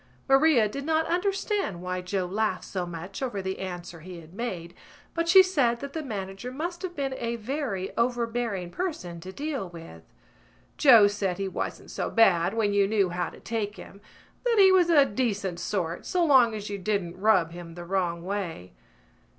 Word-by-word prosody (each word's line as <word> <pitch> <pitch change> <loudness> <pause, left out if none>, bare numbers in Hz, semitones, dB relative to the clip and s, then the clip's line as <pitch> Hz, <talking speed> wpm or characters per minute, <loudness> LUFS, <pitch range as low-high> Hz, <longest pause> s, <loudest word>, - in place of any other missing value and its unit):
Maria 270 -4 +5
did 275 +7 -6
not 320 +1 +1
understand 385 - -1
why 180 +1 -3
Joe 185 +1 -2
laughed 215 +4 -1
so 180 -2 -4
much 175 +5 -7
over 245 -7 -2
the 190 0 -4
answer 175 -3 -6
he 175 +2 -9
had 165 +1 -15
made 185 -6 -5 0.4
but 335 0 -1
she 380 +2 +9
said 275 -11 +1
that 280 +1 -7
the 320 - -3
manager 200 -2 -5
must 345 +6 -4
have 365 -2 -5
been 275 -2 -2
a 235 0 -2
very 230 -5 -3
overbearing 235 -6 -1
person 185 - -4
to 185 +3 -8
deal 275 - -4
with. 165 - -11 0.7
Joe 235 -7 +8
said 205 -3 0
he 195 0 -2
wasn't 190 - -5
so - - -2
bad 190 -4 +4
when 210 -3 +1
you 200 -1 +3
knew 200 -3 +2
how 175 0 -2
to - - -14
take 215 -2 -3
him, 200 - -12 0.4
that 480 -2 +2
he 385 -2 +7
was 360 -2 +4
a 295 -4 +6
decent 205 -7 -2
sort 175 -2 -2
so 355 -2 +2
long 255 -7 +5
as 210 -1 -5
you 200 -1 -4
didn't 185 -3 -2
rub 190 -6 +4
him 170 -1 -9
the 175 0 -8
wrong 175 -2 -1
way. 180 - -4
205 Hz, 185 wpm, -27 LUFS, 180-270 Hz, 0.7 s, she